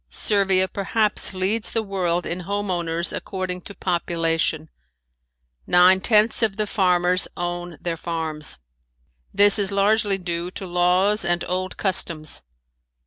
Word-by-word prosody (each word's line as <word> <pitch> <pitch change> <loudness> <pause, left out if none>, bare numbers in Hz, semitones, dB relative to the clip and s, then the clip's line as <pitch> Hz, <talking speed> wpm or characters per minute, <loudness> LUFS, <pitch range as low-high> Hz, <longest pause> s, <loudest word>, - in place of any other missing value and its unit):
Servia 195 -2 +1
perhaps 210 +2 +1
leads 195 +4 -1
the 225 - 0
world 180 -4 -2
in 175 - -3
home 200 +2 -3
owners 170 -1 0
according 185 -2 -4
to 200 - -10
population. 165 -3 -1 1.0
Nine 180 +1 +5
tenths 215 +2 +3
of 215 -3 0
the 215 - 0
farmers 180 -3 +2
own 175 -1 -4
their 170 -1 -3
farms. 160 -2 -5 0.7
This 205 +1 +4
is 200 -1 +2
largely 200 0 +2
due 175 -1 -3
to 190 - -8
laws 180 +4 +2
and 175 -1 0
old 185 +1 -3
customs. 165 -5 0
185 Hz, 130 wpm, -22 LUFS, 175-200 Hz, 1.0 s, Nine